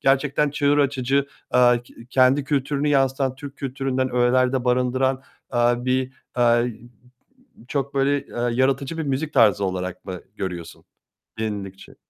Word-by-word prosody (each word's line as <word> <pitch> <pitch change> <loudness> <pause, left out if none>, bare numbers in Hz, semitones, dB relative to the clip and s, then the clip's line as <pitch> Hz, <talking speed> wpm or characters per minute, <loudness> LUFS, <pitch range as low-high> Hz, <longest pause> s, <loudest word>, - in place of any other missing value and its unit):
gerçekten 140 +2 +2
çığır 145 0 +2
açıcı, 140 0 +1 0.2
aaa, 125 -1 +5
k 120 - -20 0.2
kendi 130 +2 +4
kültürünü 140 +1 0
yansıtan 135 -2 +1
Türk 140 +1 -10
kültüründen 130 -1 -2
öğelerde 125 +1 +2
barındıran, 130 +2 +1 0.3
aaa, 120 0 +1
bir, 130 0 0 0.2
aaa 120 -1 +4 1.1
çok 140 0 -2
böyle, 140 +1 0
aaa, 120 0 0
yaratıcı 135 +5 0
bir - - -1
müzik 145 +1 -2
tarzı 100 0 +4
olarak 90 -1 -4
mı 90 -2 -6 0.2
görüyorsun 90 -4 -6 0.5
yenilikçi? 100 -3 -5
130 Hz, 130 wpm, -23 LUFS, 120-140 Hz, 1.1 s, aaa